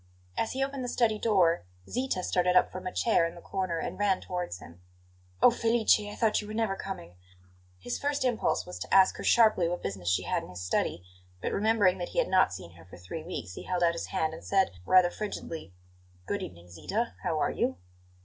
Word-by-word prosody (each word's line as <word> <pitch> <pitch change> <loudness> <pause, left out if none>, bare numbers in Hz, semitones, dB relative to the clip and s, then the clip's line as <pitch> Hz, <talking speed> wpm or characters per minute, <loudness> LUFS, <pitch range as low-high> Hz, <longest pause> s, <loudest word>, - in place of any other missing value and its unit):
As 225 - -1
he 265 +1 0
opened 275 -1 -3
the - - -3
study 220 -3 +1
door, 185 -7 +3 0.2
Zita 250 -7 -1
started 180 0 +2
up - - +5
from 185 0 -6
a - - -3
chair 200 -7 +2
in 165 - -9
the - - -10
corner 185 -3 -2
and 165 - -4
ran 200 -2 +2
towards 180 - -4
him. 85 -1 -14 0.6
"Oh, - - +9
Felice; 230 -2 +3
I 205 0 -7
thought 220 -2 +2
you 210 - -9
were 215 - -6
never 220 -3 0
coming!" 90 - -7 0.6
His 105 +7 -4
first 285 -2 0
impulse 225 - +1
was 90 0 -8
to - - -7
ask 190 -1 +6
her - - -6
sharply 215 -7 +4
what 175 - -4
business 95 -3 -3
she 90 - +2
had - - 0
in - - -11
his 90 0 -8
study; 90 -1 -1 0.4
but, - - -2
remembering 205 -3 +3
that 175 - -4
he - - -10
had - - +2
not 185 - +4
seen 90 -2 -8
her 80 - -15
for 90 - -13
three 90 - -7
weeks, 125 - -6
he - - -7
held 180 -1 0
out 170 0 +4
his 170 - -4
hand 160 0 -1
and 160 - -9
said, 195 -1 +2 0.2
rather 180 -1 +6
frigidly: 170 - -6 0.5
"Good - - -2
evening, 85 0 -9
Zita; 80 -3 -3
how - - -1
are - - +1
you?" 85 - -1
180 Hz, 225 wpm, -29 LUFS, -, 0.6 s, Oh